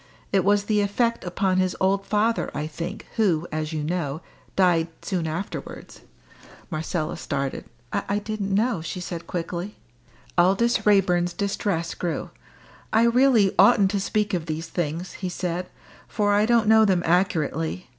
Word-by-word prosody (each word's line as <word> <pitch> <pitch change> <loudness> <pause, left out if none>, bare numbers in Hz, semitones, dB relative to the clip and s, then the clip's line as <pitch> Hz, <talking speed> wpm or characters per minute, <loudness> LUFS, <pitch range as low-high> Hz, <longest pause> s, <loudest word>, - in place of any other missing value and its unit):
It 195 -2 +3
was 205 +1 +3
the 210 0 +1
effect 230 +3 0
upon 185 +1 0
his 185 -1 +1
old 195 +1 +1
father, 220 +2 +1
I 150 +1 -2
think, 165 +3 -6
who, 175 -7 +2
as 155 0 -3
you 155 -2 -3
know, 155 -2 -2 0.3
died 175 -4 +3 0.2
soon 175 -4 -2
afterwards 165 +5 -6 0.3
" - - -22
Marcella 155 0 -2
started. 135 -1 -3 0.3
"I 200 - -1
didn't 210 -1 -3
know," 220 -4 +1
she 165 +3 -5
said 175 -2 -6
quickly. 175 +3 -4 0.6
Aldous 195 +7 +3
Raeburn's 180 -4 +3
distress 195 -4 -2
grew. 175 -2 -3 0.6
"I 220 +1 +4
really 235 -4 +4
oughtn't 195 0 +6
to 200 - 0
speak 210 +1 -1
of 170 -3 -2
these 160 +1 -4
things," 170 +1 -3
he 185 - -4
said, 180 0 -3 0.4
"for 205 -2 +1
I 210 +1 +3
don't 235 -2 +3
know 220 0 +6
them 185 -4 +2
accurately. 165 -1 0
185 Hz, 155 wpm, -24 LUFS, 170-205 Hz, 0.6 s, oughtn't